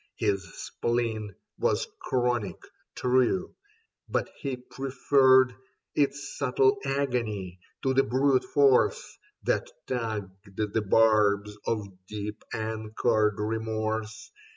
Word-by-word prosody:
His 100 -1 0
spleen 110 -4 -2 0.2
was - - +1
chronic, 120 -7 0 0.4
true; 130 +9 +1 0.6
but - - -1
he 135 -3 -3
preferred 130 0 +3 0.4
Its 145 0 0
subtle 410 -1 +3
agony 115 -10 -2 0.2
to 130 - +2
the 135 - +5
brute 135 0 +2
force 140 -3 +2 0.2
That - - 0 0.2
tugged 105 -5 -4
the 110 +1 0
barbs 105 -1 +3
of 105 -3 -1 0.2
deep 105 +1 -6
anchored 110 0 0
remorse. 110 0 -3
110 Hz, 95 wpm, -28 LUFS, 105-130 Hz, 0.6 s, the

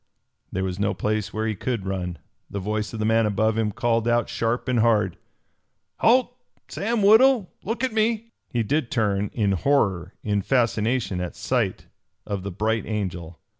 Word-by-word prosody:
There 95 - -2
was 95 0 -3
no 100 0 0
place 110 -1 -1
where 110 0 -2
he 110 - 0
could 110 0 -3
run. 90 -3 -3 0.3
The 100 - -4
voice 105 +2 -2
of 115 - -6
the 110 - -1
man 110 0 +3
above 110 +2 +1
him 110 -2 0
called 115 +2 0
out 120 0 +2
sharp 115 +3 -1
and 125 -2 +2
hard. 105 -5 +3 0.8
"Halt! 245 +1 +3 0.3
Sam 220 +1 -1
Woodhull, 220 0 +5
look 230 +4 -3
at 255 -3 0
me!" 225 +1 0 0.2
He 120 -4 0
did 135 +3 0
turn, 105 -3 0
in 105 -4 +1
horror, 95 - +1
in 100 -2 0
fascination 115 -4 +1
at 90 - -5
sight - - -1 0.4
of 100 -2 -3
the 100 - -5
Bright 110 +4 -1
Angel. 90 -6 -4
110 Hz, 170 wpm, -24 LUFS, 100-130 Hz, 0.8 s, Woodhull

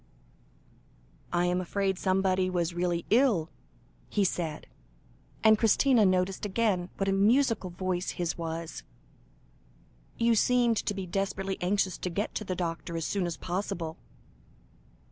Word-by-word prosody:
"I 175 0 +2
am 180 +1 +1
afraid 190 +1 -1
somebody 185 -1 +1
was 175 -2 -1
really 175 -1 -1
ill?" 220 - +3 0.6
he 205 - +1
said, 165 -5 -2 0.8
and 220 -1 +6
Christina 230 0 +4
noticed 185 +1 0
again 200 -3 0
what 195 - -1
a - - +2
musical 220 0 +3
voice 180 0 -2
his 175 -2 -1
was. 165 -1 -5 1.4
"You 235 0 +3
seemed 240 0 +3
to 205 - -1
be 195 -1 -4
desperately 195 +1 -2
anxious 185 0 0
to 180 - -3
get 200 +5 -2
the 190 -4 -3
doctor 170 -1 -3
as 165 - -2
soon 195 -3 -1
as 170 - -4
possible." 170 -3 -4
185 Hz, 130 wpm, -29 LUFS, 175-205 Hz, 1.4 s, and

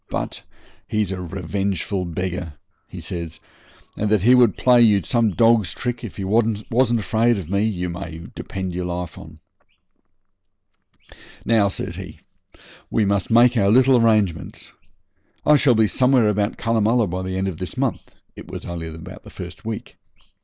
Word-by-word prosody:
But - - -4 0.5
he's 105 -3 -1
a 95 -1 -4
revengeful 95 +1 -3
beggar,' 90 -2 -4 0.3
he - - -9
says, 85 -2 -6 0.6
'and 105 - -1
that 105 -3 +2
he 125 +3 +6
would 125 -4 +5
play 125 -1 +5
you 105 -4 +4
some 115 -3 +2
dog's 110 -3 +3
trick 120 0 -4
if 115 - -8
he 100 - -4
wasn't 115 +3 +1
afraid 115 +2 +1
of 90 -3 -7
me, 100 +2 +2
you 90 -5 -2
may 85 -2 -7
depend 95 -2 -5
your 90 0 -3
life 90 -1 -4
on.' - - -12 2.1
'Now,' 110 -3 +3
says 100 - -5
he, - - -9 0.7
'we 110 - +1
must 100 -2 0
make 120 +2 +5
our 100 -4 +3
little 130 +4 +5
arrangements. 105 -7 0 0.7
I 150 - +6
shall 135 -4 +4
be 110 0 +4
somewhere 125 0 +3
about 105 +1 -1
Cunnamulla 115 +1 +2
by 90 0 -4
the 95 0 -4
end 95 +1 -1
of 90 -3 -5
this 90 -4 -6
month' - - -3 0.2
(it - - -11
was - - -7
only 85 -2 -5
the 80 +1 -10
first 90 +5 -9
week). 110 -1 -6
100 Hz, 160 wpm, -21 LUFS, 90-115 Hz, 2.1 s, he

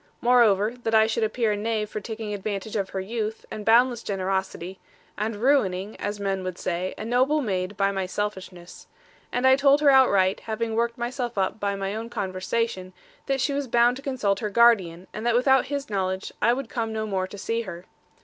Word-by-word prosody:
Moreover, 230 -3 +4
that 225 -1 0
I 220 0 +6
should 225 +1 -1
appear 220 0 0
a - - 0
knave 215 0 -1
for - - -3
taking 220 0 -5
advantage 205 +1 -4
of 195 -2 -1
her 190 - -4
youth, 220 +2 -4
and 215 - -5
boundless 235 +2 +4
generosity, 190 -2 -3 0.4
and 215 +1 -2
ruining 210 -5 +1
(as 205 0 -4
men 195 -1 -2
would 185 -1 -5
say) 180 +1 -3
a 215 - -6
noble 260 +6 +2
maid 195 -5 -2
by 195 0 +2
my 190 -1 -2
selfishness. 185 -3 -6 0.4
And 250 +1 0
I 260 0 +7
told 280 +1 +4
her 290 -2 +6
outright, 200 -8 +4
having 225 0 -3
worked 235 +1 0
myself 240 -1 -3
up 190 +2 0
by 200 -1 -1
my 195 0 -3
own 225 +2 -5
conversation, 190 -1 -3 0.3
that 270 -1 0
she 280 - 0
was 280 -1 -2
bound 240 +1 +3
to - - -9
consult 255 -8 -1
her 215 -3 -2
guardian, 195 -6 +3
and 215 - -6
that 235 0 +2
without 265 +1 +4
his 280 0 -3
knowledge, 190 -2 -2
I 235 - +4
would 260 +1 -2
come 225 -1 -3
no 220 0 -2
more 190 -3 -2
to 205 - -10
see 230 +4 -2
her. 180 -4 -8
215 Hz, 205 wpm, -25 LUFS, 195-240 Hz, 0.4 s, I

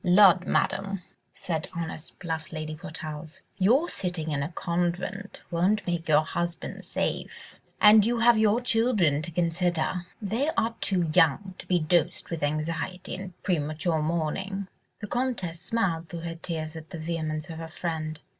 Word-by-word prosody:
"Lud, 185 -1 +6
Madame!" 195 -1 0 0.3
said 160 -3 -3
honest, 165 -1 -5
bluff 160 -3 -4
Lady 155 -1 -4
Portarles, 155 0 -7 0.2
"your 250 - +4
sitting 175 - -2
in 140 -1 0
a 140 - -2
convent 180 +3 -2
won't 185 +4 +2
make 175 -2 -2
your 155 0 +6
husband 170 +2 -4
safe, - - -4 0.2
and 210 0 +8
you 235 +3 +1
have 235 +1 +6
your 220 +1 +4
children 225 - +3
to 155 - -5
consider: 175 +1 0
they 230 +8 0
are 230 0 +2
too 180 -4 +1
young 175 +6 +4
to - - -10
be 180 - +3
dosed 170 +1 +1
with 165 - -3
anxiety 155 +5 -2
and 185 -1 -7
premature 160 -1 0
mourning." 170 +5 -1 0.3
The - - -3
Comtesse 215 -9 -2
smiled 175 -8 -1
through 170 -1 -5
her 165 0 -4
tears 160 -2 -4
at 160 0 -9
the 175 - -6
vehemence 155 -1 -3
of 160 - -7
her 165 - -5
friend. 160 -2 -3
170 Hz, 155 wpm, -27 LUFS, 160-195 Hz, 0.3 s, and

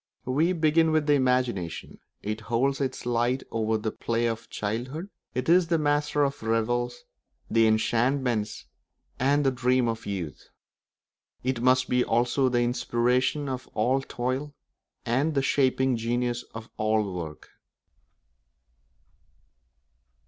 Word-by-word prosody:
We 150 +8 +2
begin 160 -1 +3
with 155 -1 +2
the 145 - +4
imagination; 125 - 0 0.2
it 110 +1 -3
holds 130 +5 0
its 130 -3 -3
light 120 +2 +1
over 110 0 0
the 110 0 -3
play 115 0 -1
of 115 -1 -3
childhood; 130 - -4 0.2
it 125 - -2
is 175 +1 +5
the 170 0 +2
master 145 -1 +1
of 140 0 -1
the 110 - -5
revels, 120 +2 0 0.5
the 115 -1 +5
enchantments, 120 +1 +1 0.5
and 140 +2 +2
the 135 - +4
dreams 125 -1 +2
of 115 -1 -4
youth; 90 -7 -5 0.9
it 130 -1 -1
must 130 +1 +3
be 125 0 +2
also 120 +3 +2
the 120 -1 +1
inspiration 125 +3 +1
of 130 -1 -4
all 125 +5 +2
toil 135 +3 -3 0.5
and 135 +7 +1
the 135 - +2
shaping 130 -1 +2
genius 120 +1 -1
of 110 0 -7
all 110 -2 +1
work. 80 -4 -7
125 Hz, 130 wpm, -27 LUFS, 115-135 Hz, 0.9 s, is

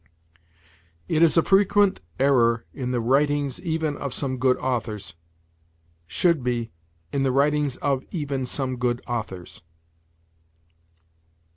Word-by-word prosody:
"It 155 - +1
is 165 0 +5
a 165 - +5
frequent 200 0 +3 0.2
error 120 -4 +3
in 130 -3 -4
the 125 -1 0
writings 140 +3 +1
even 160 -3 -1
of 140 -3 -4
some 130 -2 -1
good 130 0 +3
authors": 110 -6 -3 0.9
should 165 - +2
be, 120 -2 -2 0.4
"in 140 - 0
the 135 -1 +2
writings 145 0 +2
of 135 -2 +1
even 140 -6 -3
some 130 0 -2
good 120 0 -1
authors." 105 -7 -5
135 Hz, 120 wpm, -24 LUFS, 120-150 Hz, 0.9 s, is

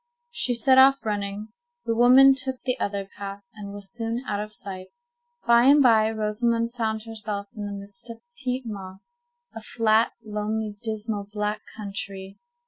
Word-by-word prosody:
She 245 - -1
set 260 +3 +5
off 270 0 +6
running. 205 0 -3 0.4
The 230 - +1
woman 255 +4 +7
took 265 -1 -2
the 255 -1 0
other 200 -1 -2
path, 200 +1 -8
and 205 -2 -8
was 200 +1 -9
soon 230 +1 -3
out 205 -1 -1
of 210 0 -5
sight. 190 -2 -8 0.6
By 235 0 +5
and 285 +1 +7
by, 220 -3 +5
Rosamond 230 +2 0
found 220 -3 -2
herself 210 -3 -4
in 210 -1 -5
the - - -5
midst 200 +3 -9
of 230 - -7
a 240 +3 -23
peat 255 0 -1
moss—a 355 - -10
flat, 220 0 +2
lonely, 210 0 -3
dismal, 215 -2 -4
black 210 0 -2 0.2
country. 195 -2 -6
220 Hz, 160 wpm, -25 LUFS, 205-240 Hz, 0.6 s, woman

